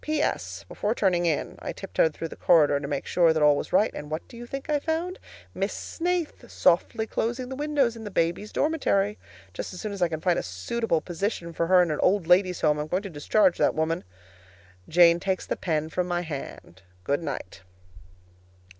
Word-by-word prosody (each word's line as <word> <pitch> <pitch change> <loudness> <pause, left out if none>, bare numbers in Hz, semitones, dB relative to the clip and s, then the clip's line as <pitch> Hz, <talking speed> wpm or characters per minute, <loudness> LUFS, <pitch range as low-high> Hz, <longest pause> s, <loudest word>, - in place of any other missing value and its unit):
P.S. 100 - -2
Before 210 - -2
turning 180 -5 +2
in, 155 - -1
I - - -5
tiptoed 125 - 0
through 165 - -5
the - - -9
corridor 150 -5 +4
to 140 - -5
make 140 -1 -3
sure 170 -2 +3
that 155 -1 +1
all 150 -1 +6
was - - -4
right, 200 +4 +3
and 150 - -7
what 155 +1 -4
do - - -14
you 240 +1 -9
think 275 +2 -6
I 300 -1 +1
found? 330 +5 -2 0.3
Miss - - -2
Snaith 350 -1 -3
softly 220 - +2
closing 240 +3 -2
the 265 - -5
windows 285 -4 +1
in 225 - -9
the 210 - -5
babies' 175 +3 -1
dormitory! 210 -10 +1 0.3
Just 90 - -6
as - - -8
soon 215 - -4
as 200 -2 -6
I 175 - +4
can 160 -2 -4
find 175 +1 +1
a - - -2
suitable 160 - -2
position 175 -1 -3
for 165 +1 -1
her 180 0 +6
in 170 - -1
an 150 - -2
old 190 -1 +2
ladies' 180 +1 +3
home, 150 -1 +2
I - - 0
am 150 - -4
going 180 +5 -1
to 195 - -7
discharge 180 +5 +2
that - - +3
woman. 160 +2 -1 0.9
Jane 170 0 +6
takes 190 0 -2
the - - -2
pen 155 -3 -1
from 180 +2 -1
my 175 0 -1
hand. 140 - -8 0.2
Good 140 - 0
night. 90 - -6
180 Hz, 210 wpm, -26 LUFS, 160-220 Hz, 0.9 s, all